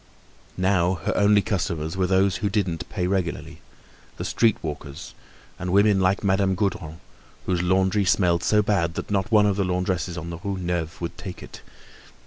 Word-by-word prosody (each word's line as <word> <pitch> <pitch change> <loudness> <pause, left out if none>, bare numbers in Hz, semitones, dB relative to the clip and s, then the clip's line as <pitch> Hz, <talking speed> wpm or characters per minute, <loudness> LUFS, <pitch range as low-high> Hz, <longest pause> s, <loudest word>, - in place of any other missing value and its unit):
Now 95 -1 +2
her - - 0
only 105 0 +4
customers 85 -5 -2
were 95 -1 +1
those 95 0 +2
who 105 -1 -1
didn't 95 -6 -2
pay 90 -4 -2
regularly, 90 -2 -3 0.6
the - - -4
street 115 -3 +2
walkers, 75 -3 -7 0.5
and 90 0 -3
women 100 +1 +4
like 95 +2 +1
Madame 95 -1 +2
Gaudron, 90 -5 -2 0.5
whose 90 -2 0
laundry 95 +2 +2
smelled 90 -2 +2
so 105 -1 +3
bad 85 -5 0
that - - -5
not 100 +3 0
one 105 -2 +5
of 100 -1 +1
the 100 - +2
laundresses 90 -1 -1
on 85 0 -5
the 85 - -6
Rue 100 +1 -3
Neuve 85 -2 -3
would 85 +1 -5
take 95 -1 -8
it. - - -11
95 Hz, 175 wpm, -24 LUFS, 85-100 Hz, 0.6 s, one